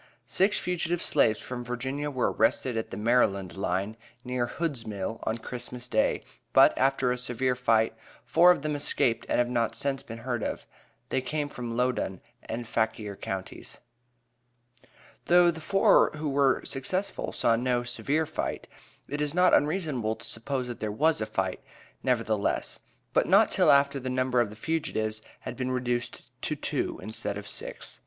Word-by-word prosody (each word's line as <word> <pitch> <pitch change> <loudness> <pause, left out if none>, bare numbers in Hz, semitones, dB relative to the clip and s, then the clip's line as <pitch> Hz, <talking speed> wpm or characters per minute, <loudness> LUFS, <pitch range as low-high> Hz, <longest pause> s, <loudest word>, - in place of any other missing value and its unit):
Six 195 +3 +2
fugitive 175 -1 -1
slaves 110 -10 +3
from 125 -1 -5
Virginia 130 +4 -3
were 130 -3 0
arrested 125 -3 +1
at 110 - -2
the - - -6
Maryland 105 -5 +2
line, 95 +3 -2 0.3
near 125 -1 -1
Hood's 145 -4 -3
Mill, 105 +1 -4
on 110 - 0
Christmas 120 +1 -7
day, 110 -2 +1 0.3
but, - - +7
after 135 -1 +2
a 125 - -1
severe 125 +1 0
fight, 115 -3 +2 0.3
four 175 +2 +6
of 180 -5 +4
them 155 0 -1
escaped 120 -5 +1
and - - +2
have 120 - +3
not 120 -2 0
since 140 -1 0
been 115 - -8
heard 120 0 -3
of. - - -3 0.4
They 130 - 0
came 145 +2 -2
from 120 -3 -5
Loudoun 125 -7 0 0.2
and 120 +1 -5
Fauquier 110 -3 -1
counties. 95 -1 -6 1.5
Though 175 0 +6
the 160 -1 -9
four 195 +5 +5
who 150 0 -3
were 140 -1 +2
successful, 185 +9 -2
saw 115 - +2
no 120 +1 0
"severe 140 +6 0
fight," 155 - -4 0.4
it 145 +2 -3
is 150 +1 -1
not 180 0 +5
unreasonable 145 - +1
to - - -9
suppose, 125 +2 -2
that 120 - -6
there 110 -1 -2
was 155 +5 +2
a 110 - -1
fight, 95 -1 -2 0.4
nevertheless; 115 -5 0 0.3
but - - +3
not - - +5
till - - +4
after 140 0 +4
the 130 0 -4
number 130 -1 +2
of 115 - 0
the 105 - -10
fugitives 110 -6 -2 0.2
had - - -6
been 130 -1 -2
reduced 125 -1 -2 0.2
to - - -1
two, - - -2
instead 105 -2 -4
of 100 0 -8
six. - - -5
125 Hz, 170 wpm, -28 LUFS, 110-145 Hz, 1.5 s, but